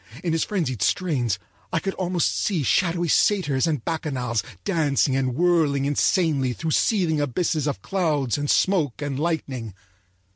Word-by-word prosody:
In 170 - 0
his 165 - +1
frenzied 160 - -2
strains 135 - 0 0.3
I - - 0
could 195 - -2
almost 180 -3 0
see 180 -8 0
shadowy 175 - +1
satyrs 160 -5 +2
and 150 -7 -2
bacchanals 130 -8 -2 0.2
dancing 150 -7 +1
and 130 -2 0
whirling 160 -4 +2
insanely 145 -2 +1
through 160 +5 -3
seething 170 -6 +2
abysses 150 +2 -1
of 105 -10 -3
clouds 155 -10 0
and 145 0 -2
smoke 155 -9 +1
and 140 -2 -3
lightning. 135 - -3
150 Hz, 145 wpm, -24 LUFS, 135-175 Hz, 0.3 s, satyrs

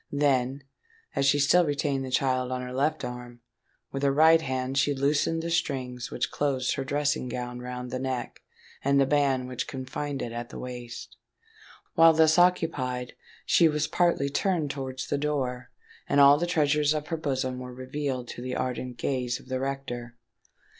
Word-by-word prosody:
Then, 135 -1 +1 0.5
as 140 - +2
she 145 - +4
still 145 +5 +5
retained 145 -3 -1
the 130 - -5
child 130 -1 +1
on 125 0 -2
her 125 0 -6
left 145 +2 0
arm, 125 -1 -8 0.5
with 135 - -4
her 140 -1 +3
right 160 +3 +6
hand 130 -2 -2
she 145 0 +2
loosened 145 +4 +1
the 170 - -3
strings 130 -7 -2
which - - -2
closed 135 -3 0
her 135 - -3
dressing 145 -2 -1
gown 125 0 -5
round 125 0 -6
the 130 - -2
neck 130 -1 -4 0.4
and 140 0 +3
the 135 - +5
band 135 -2 +1
which 125 -1 -4
confined 135 +2 -4
it 120 - -5
at 120 0 -5
the - - -9
waist. 125 -1 -8 0.8
While 165 0 +7
thus 160 +1 +5
occupied, 135 -8 +1 0.3
she 165 -2 +5
was 150 0 0
partly 170 -4 +1
turned 160 -2 0
towards 130 -1 -5
the 145 - -1
door; 130 -4 -2 0.4
and 145 - +3
all 140 +1 +8
the 175 - 0
treasures 150 -2 +2
of 150 -1 -4
her 165 - -1
bosom 130 -4 -2
were 125 0 -7
revealed 130 0 -4
to - - -7
the 125 0 -4
ardent 125 -1 -3
gaze 125 -2 -1
of - - -17
the 130 0 -1
rector. 130 -3 -4
135 Hz, 180 wpm, -27 LUFS, 125-145 Hz, 0.8 s, all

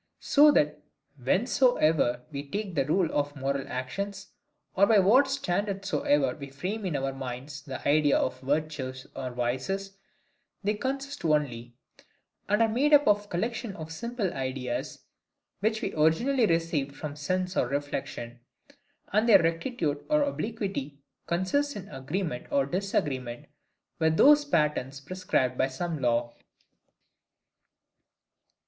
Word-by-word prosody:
So 300 +1 +6
that 150 - +2 0.4
whencesoever 160 - +2
we 140 0 -6
take 200 +2 -3
the 140 -4 +1
rule 170 +1 +2
of 145 0 -1
moral 140 0 -2
actions; 195 +11 -5 0.5
or 200 +1 +5
by 220 - +5
what 225 +9 +5
standard 200 -6 -1
soever 145 -9 +2
we 140 -2 -8
frame 190 +9 -4
in 165 - -2
our 135 -1 -1
minds 135 +2 -6
the 135 -2 -6
ideas 145 0 +4
of 130 - -1
virtues 135 -2 -2
or 130 - -4
vices, 130 +12 -3 0.7
they 205 +2 +1
consist 275 +5 -4
only, 125 -7 0 0.7
and 210 +3 +4
are - - +4
made 275 +7 +4
up 290 0 +4
of 205 0 +3
collections 225 +3 -3
of 160 -1 -8
simple 230 +1 -3
ideas, 130 -2 -4 0.5
which 220 +3 0
we - - -2
originally 220 - +3
received 165 -5 0
from 150 -1 -6
sense 180 +5 -2
or - - +2
reflection: 135 -3 -4 0.7
and 215 +3 +3
their 195 -6 +8
rectitude 165 - -1
or 300 -1 +4
obliquity 200 - -3 0.3
consists 225 +12 0
in 195 - -6
the 205 - -11
agreement 135 -1 -3
or 140 -1 +2
disagreement 135 -8 -2 0.5
with 160 0 +2
those 290 +1 +7
patterns 150 - 0
prescribed 140 -5 -1
by - - +3
some 155 +3 -4
law. 120 -1 +1
160 Hz, 135 wpm, -28 LUFS, 135-205 Hz, 0.7 s, their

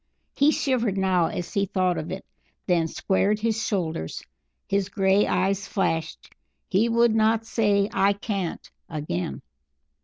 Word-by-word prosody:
He 285 +2 +4
shivered 245 -9 0
now 185 -3 +2
as 175 - -5
he 200 -1 +1
thought 185 -1 0
of 155 - -6
it; 190 - -6 0.4
then 170 -3 +2
squared 195 +5 0
his 225 0 0
shoulders. 160 - -2 0.4
His 200 -1 0
grey 195 0 +3
eyes 195 +1 0
flashed; 165 -5 -2 0.3
he 210 +5 +2
would 235 0 +4
not 220 0 +2
say 205 -3 +2
"I 200 +1 +3
can't" 200 -4 -4 0.2
again. 90 - -4
195 Hz, 140 wpm, -25 LUFS, 180-215 Hz, 0.4 s, He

